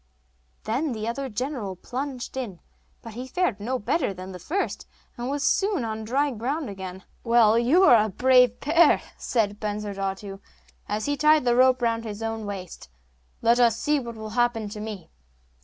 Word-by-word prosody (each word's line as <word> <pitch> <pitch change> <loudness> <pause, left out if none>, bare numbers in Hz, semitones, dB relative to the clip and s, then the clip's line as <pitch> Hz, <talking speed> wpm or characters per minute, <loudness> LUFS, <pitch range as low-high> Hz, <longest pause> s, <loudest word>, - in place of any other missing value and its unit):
Then 255 +6 -1
the 215 0 -4
other 265 +3 -3
general 235 -4 -4
plunged 255 +5 -5
in; 225 -10 -5 0.4
but 230 - -9
he 250 +3 -6
fared 260 - 0
no 250 +5 -2
better 245 - -1
than 185 +1 -8
the 180 - -8
first, 350 - -3 0.3
and 240 +1 -4
was 285 +1 -2
soon 390 - +1
on 220 0 -4
dry 280 +5 +1
ground 260 +3 -3
again. 190 -1 -8 0.2
'Well, 230 -1 +5
you 285 +11 +4
are 235 - +7
a - - -3
brave 250 +2 +4
pair!' 330 +4 +4 0.2
said 210 -4 0
Bensurdatu, 200 -2 -4 0.5
as 210 +1 -2
he 290 - 0
tied 300 -1 +4
the 240 -1 +3
rope 255 0 +4
round 230 -1 +1
his 215 -1 -6
own 225 -1 -3
waist; 185 - -7 0.5
'let 235 +1 +4
us 230 -2 +4
see 295 0 +1
what 235 -3 -7
will 220 -1 -7
happen 240 -2 0
to 210 +1 -7
me. 210 -4 -7
235 Hz, 175 wpm, -25 LUFS, 210-260 Hz, 0.5 s, are